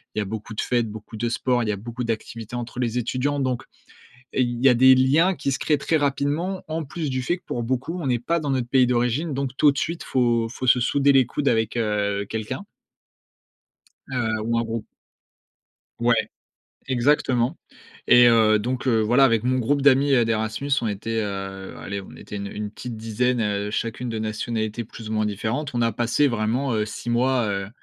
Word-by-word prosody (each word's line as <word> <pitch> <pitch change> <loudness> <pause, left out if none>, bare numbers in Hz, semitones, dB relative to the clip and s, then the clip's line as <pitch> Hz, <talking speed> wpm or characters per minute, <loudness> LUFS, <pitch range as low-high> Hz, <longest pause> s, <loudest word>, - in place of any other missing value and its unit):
il - - 0
y - - +1
a - - -2
beaucoup 110 +2 -6
de - - -1
fêtes, 120 -3 0
beaucoup 110 +1 -9
de 120 +2 -1
sports, 125 +1 0
il 110 - -2
y - - +3
a - - -4
beaucoup 120 +4 -6
d'activités 115 0 -5
entre 120 0 -5
les 120 -1 -1
étudiants. 130 +4 -1
Donc, 130 -3 -1 0.7
il 120 -2 0
y - - +9
a 125 - +6
des 130 +2 +7
liens 155 +8 +3
qui 140 - -2
se 135 - -2
créent 150 - +2
très 160 +3 +1
rapidement, 145 +6 -1
en 160 +1 -3
plus 150 +1 -4
du 130 0 -1
fait 175 +7 0
que 180 - -27
pour 120 - -3
beaucoup, 130 +9 -2
on 145 - -3
n'est 125 -2 +1
pas 170 +8 0
dans 145 -3 -3
notre 130 -3 -1
pays 130 -1 +4
d'origine, 125 +6 0
donc, 135 -1 -3
tout 145 - +6
de 140 - -8
suite, 165 +5 -2
faut 120 -3 +1
faut 130 +2 -5
se 125 - +6
souder 140 +3 +3
les 135 -2 +5
coudes 140 - -3
avec, 110 +1 0
heu, 105 -2 0
quelqu'un 110 - -4 1.4
heu, 110 -4 -1
ou 115 - +1
un 115 - 0
groupe. 115 -1 -4 1.1
Ouais, 120 0 +3 0.7
exactement 130 +1 +1 0.5
et 120 0 +7
heu, 110 -2 +5
donc, 125 +4 -3
heu, 115 -3 +3
voilà, 120 +5 +4
avec 115 -3 +3
mon 130 +1 +1
groupe 140 +4 +1
d'amis, 140 0 +4
heu, 120 -3 +4
d'Erasmus, 110 +4 -2
on 115 - 0
était, 110 +2 -2
heu, 95 -1 -5
allez, 100 0 -5
on 95 - -12
était - - -10
une 100 0 -4
une 105 0 -5
petite 115 +2 -7
dizaine, 115 +3 0
heu, 105 -1 -1
chacune 115 +3 -3
de 115 - -3
nationalités 110 +1 -3
plus 110 0 -10
ou - - -2
moins 110 0 +1
différentes. 115 +8 -3
On 120 - +1
a 115 0 +2
passé 120 +6 +2
vraiment, 120 +3 0
heu, 105 -1 +1
6 120 - -7
mois, 125 -1 +2
heu, 100 -1 -2
120 Hz, 210 wpm, -23 LUFS, 110-130 Hz, 1.4 s, y